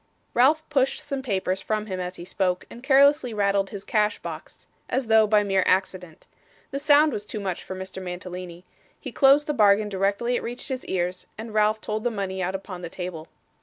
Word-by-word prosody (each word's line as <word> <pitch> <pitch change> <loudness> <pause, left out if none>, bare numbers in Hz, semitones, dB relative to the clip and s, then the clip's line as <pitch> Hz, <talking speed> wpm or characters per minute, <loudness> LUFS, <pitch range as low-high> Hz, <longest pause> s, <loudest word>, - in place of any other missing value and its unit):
Ralph 305 +6 +3
pushed 270 -3 +1
some 275 -2 -3
papers 190 -6 -1
from 215 -1 -2
him 190 -3 -5
as 180 0 -4
he 175 - -9
spoke, 180 -1 -1
and 240 - -10
carelessly 275 -2 +4
rattled 200 -1 +1
his 200 -2 -7
cash 210 -1 +1
box, - - -9 0.2
as 260 0 0
though 220 -1 +5
by 210 0 +4
mere 195 -1 +2
accident. 185 -3 -1 0.5
The 275 - -3
sound 295 0 +5
was 205 - -3
too 210 - -6
much 190 -3 -4
for 190 - -7
Mr 190 0 -7
Mantalini. 180 -1 -7 0.3
He - - -7
closed 280 +1 +5
the 300 - -1
bargain 210 -3 +4
directly 200 +5 0
it - - -1
reached 245 +4 -6
his 260 -1 -4
ears, 180 0 -2
and 220 0 -7
Ralph 215 0 +2
told 215 0 -3
the 245 - +1
money 195 -4 -3
out 185 +1 -1
upon 190 -2 -7
the 170 - -6
table. 175 -3 -6
205 Hz, 205 wpm, -25 LUFS, 185-245 Hz, 0.5 s, though